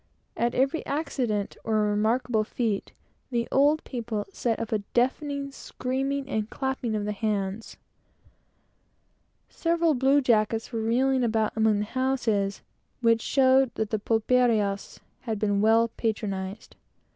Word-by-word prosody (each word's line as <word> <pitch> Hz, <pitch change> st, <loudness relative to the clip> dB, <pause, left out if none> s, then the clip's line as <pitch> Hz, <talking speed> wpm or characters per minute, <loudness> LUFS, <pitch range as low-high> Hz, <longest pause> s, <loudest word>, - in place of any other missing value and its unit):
At 235 Hz, +1 st, 0 dB
every 275 Hz, +5 st, +1 dB
accident, 250 Hz, -9 st, -2 dB
or 215 Hz, -1 st, +1 dB
remarkable 220 Hz, +2 st, +1 dB
feat, 215 Hz, -2 st, -2 dB, 0.4 s
the 235 Hz, -2 st, -1 dB
old 290 Hz, +3 st, +3 dB
people 230 Hz, -4 st, -4 dB
set 230 Hz, -2 st, -1 dB
up 230 Hz, -, -4 dB
a 220 Hz, -, +1 dB, 0.2 s
deafening 280 Hz, +3 st, 0 dB
screaming 270 Hz, +1 st, -3 dB
and 220 Hz, -5 st, -2 dB
clapping 265 Hz, -4 st, -2 dB
of 210 Hz, -1 st, -2 dB
hands. 210 Hz, 0 st, -3 dB, 1.7 s
Several 335 Hz, -1 st, +1 dB
blue 270 Hz, +2 st, +3 dB
jackets 225 Hz, -3 st, +1 dB
were 225 Hz, -2 st, -2 dB
reeling 255 Hz, +3 st, +2 dB
about 220 Hz, -2 st, 0 dB
among 220 Hz, -1 st, +3 dB
the 210 Hz, -, -1 dB
houses, 225 Hz, -5 st, -1 dB, 0.4 s
which 230 Hz, -1 st, +3 dB
showed 265 Hz, 0 st, +3 dB
that 220 Hz, -1 st, -2 dB
the 215 Hz, -, 0 dB
pulperias 220 Hz, -2 st, +1 dB, 0.2 s
had 225 Hz, -4 st, -3 dB
been 205 Hz, -1 st, +1 dB
well 225 Hz, +2 st, +4 dB
patronized. 205 Hz, -3 st, -4 dB
230 Hz, 125 wpm, -26 LUFS, 215-260 Hz, 1.7 s, well